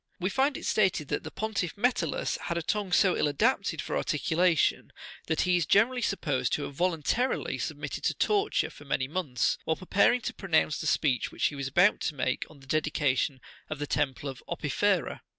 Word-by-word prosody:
"We 185 Hz, +2 st, -1 dB
find 270 Hz, +6 st, +1 dB
it -, -, -8 dB
stated 185 Hz, -8 st, +1 dB
that 150 Hz, -, -1 dB
the -, -, -7 dB
pontiff 205 Hz, -4 st, -3 dB
Metellus 205 Hz, -, 0 dB
had 170 Hz, -, -2 dB
a 170 Hz, -, -2 dB
tongue 205 Hz, +1 st, -2 dB
so 185 Hz, 0 st, +4 dB
ill -, -, +1 dB
adapted 220 Hz, -, 0 dB
for -, -, -3 dB
articulation, 170 Hz, -3 st, +1 dB, 0.4 s
that 160 Hz, -1 st, +1 dB
he 180 Hz, -1 st, +3 dB
is 170 Hz, -4 st, -1 dB
generally 245 Hz, +5 st, +3 dB
supposed 145 Hz, -, -1 dB
to 145 Hz, -, 0 dB
have 140 Hz, -, -6 dB
voluntarily 180 Hz, -, 0 dB
submitted -, -, -4 dB
to -, -, +1 dB
torture 420 Hz, 0 st, +1 dB
for -, -, -14 dB
many 130 Hz, -2 st, -1 dB
months, 150 Hz, -6 st, -1 dB
while 160 Hz, -, 0 dB
preparing 200 Hz, +7 st, +2 dB
to -, -, -4 dB
pronounce 160 Hz, -5 st, +1 dB
the 155 Hz, -, -3 dB
speech 140 Hz, -5 st, +1 dB
which -, -, -1 dB
he 145 Hz, -, 0 dB
was 140 Hz, -1 st, -3 dB
about, 180 Hz, +9 st, +4 dB
to 150 Hz, -, -2 dB
make 130 Hz, 0 st, -2 dB
on 145 Hz, -3 st, -16 dB
the -, -, -15 dB
de 155 Hz, +4 st, +1 dB
dication 140 Hz, -3 st, 0 dB, 0.3 s
of 155 Hz, -, -4 dB
the 145 Hz, -, -3 dB
temple 140 Hz, -1 st, -1 dB
of 135 Hz, -1 st, -7 dB
Opifera. 170 Hz, +3 st, 0 dB
165 Hz, 200 wpm, -28 LUFS, 145-200 Hz, 0.4 s, so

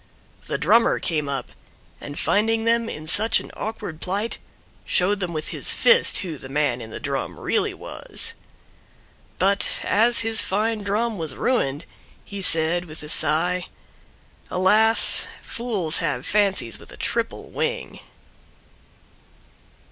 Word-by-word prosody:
The -, -, -2 dB
drummer 230 Hz, 0 st, +3 dB
came 150 Hz, -4 st, -2 dB
up, 135 Hz, -3 st, -4 dB, 0.5 s
and 145 Hz, +1 st, -8 dB
finding 225 Hz, +2 st, +1 dB
them 230 Hz, 0 st, +1 dB
in 155 Hz, -, -7 dB
such 215 Hz, +8 st, +5 dB
an -, -, -10 dB
awkward 190 Hz, -7 st, -6 dB
plight 200 Hz, +5 st, -2 dB, 0.4 s
showed 195 Hz, +3 st, +1 dB
them 180 Hz, -3 st, -3 dB
with 155 Hz, -2 st, -4 dB
his -, -, 0 dB
fist 485 Hz, -1 st, +4 dB
who 160 Hz, -6 st, -6 dB
the 130 Hz, -, -10 dB
man 135 Hz, -4 st, 0 dB
in 110 Hz, -, -8 dB
the -, -, -7 dB
Drum -, -, -4 dB
really -, -, 0 dB
was. -, -, -1 dB, 1.0 s
But 200 Hz, +2 st, +1 dB
as 230 Hz, +3 st, +3 dB
his 225 Hz, -1 st, +1 dB
fine 215 Hz, +3 st, -1 dB
Drum 210 Hz, +1 st, -1 dB
was 155 Hz, -5 st, -3 dB
ruined, 145 Hz, -, -1 dB, 0.4 s
he 200 Hz, -1 st, -7 dB
said, 170 Hz, 0 st, +2 dB
with 155 Hz, -2 st, -10 dB
a 150 Hz, -, -8 dB
sigh, 170 Hz, +4 st, +3 dB, 0.8 s
"Alas! 215 Hz, +5 st, +4 dB, 0.2 s
Fools 205 Hz, -10 st, -1 dB
have 150 Hz, -5 st, -2 dB
fancies 195 Hz, -, +1 dB
with -, -, -13 dB
a -, -, -12 dB
triple -, -, -3 dB
wing!" -, -, -3 dB
185 Hz, 135 wpm, -23 LUFS, 155-220 Hz, 1.0 s, such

